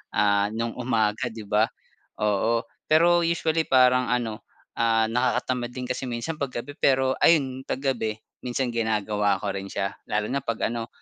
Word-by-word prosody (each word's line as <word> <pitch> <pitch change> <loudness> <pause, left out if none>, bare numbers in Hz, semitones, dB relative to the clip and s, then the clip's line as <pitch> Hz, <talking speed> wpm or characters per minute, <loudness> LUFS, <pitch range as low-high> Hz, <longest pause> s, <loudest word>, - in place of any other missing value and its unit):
ah, 100 0 +3
nung 115 +1 -2
umaga 115 -1 0
'di 110 -2 -9
ba? 105 +2 +3 0.5
Po 105 +3 +1 0.2
pero 170 +3 +5
usually 165 -1 +1
parang 125 -1 +4
ano, 115 -4 -2 0.4
ah, 115 -1 +3
nakakatamad 125 0 0
din 125 -1 -4
kasi 130 +1 -3
minsan 120 +7 -3
kapag 125 -4 -3
gabi 145 - -9
pero 130 -1 +3
ayun 135 -5 +4
pag 130 - -2
gabi 115 -6 0 0.3
minsan 125 0 -1
ginagawa 105 -2 +1
ko 100 - -1
rin 100 0 -5
siya 100 0 -2 0.2
lalo 105 0 -1
na 140 - 0
kapag 115 -3 -1
ano, 115 -1 -4
120 Hz, 165 wpm, -25 LUFS, 110-130 Hz, 0.5 s, pero